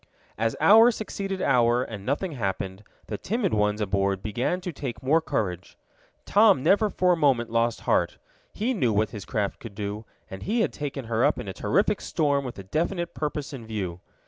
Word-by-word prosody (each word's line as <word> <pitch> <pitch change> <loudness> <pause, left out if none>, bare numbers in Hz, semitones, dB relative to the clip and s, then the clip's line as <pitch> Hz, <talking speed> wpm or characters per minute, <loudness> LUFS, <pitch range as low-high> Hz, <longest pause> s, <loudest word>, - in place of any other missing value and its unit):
As 115 +1 0
hour 225 +3 +7
succeeded 195 -4 -4
hour 120 -1 +3
and 105 -5 -7
nothing 145 - -1
happened, 95 -5 -3 0.2
the 105 - -5
timid 215 -2 -1
ones 105 0 +1
aboard 100 -1 0
began 120 - -1
to 180 -1 -5
take 135 -3 -6
more 155 +5 +3
courage. 90 - -3 0.5
Tom 205 -9 +5
never 210 +2 +4
for 180 -1 +2
a - - +2
moment 135 -8 +2
lost 115 0 +1
heart. - - +1 0.3
He 235 +5 -1
knew 130 - +1
what 105 0 +1
his 105 -4 -7
craft 105 -5 -2
could 110 -4 -10
do, 105 +1 -4 0.2
and 95 - -9
he 225 +4 0
had - - 0
taken 140 -3 -5
her 115 +1 0
up - - +3
in - - -6
a 95 - -4
terrific 205 - +1
storm 145 -4 0
with 125 -2 -6
a 95 - -7
definite 170 - -2
purpose 150 -1 -4
in 120 -5 -8
view. 95 -6 -4
125 Hz, 195 wpm, -26 LUFS, 105-175 Hz, 0.5 s, hour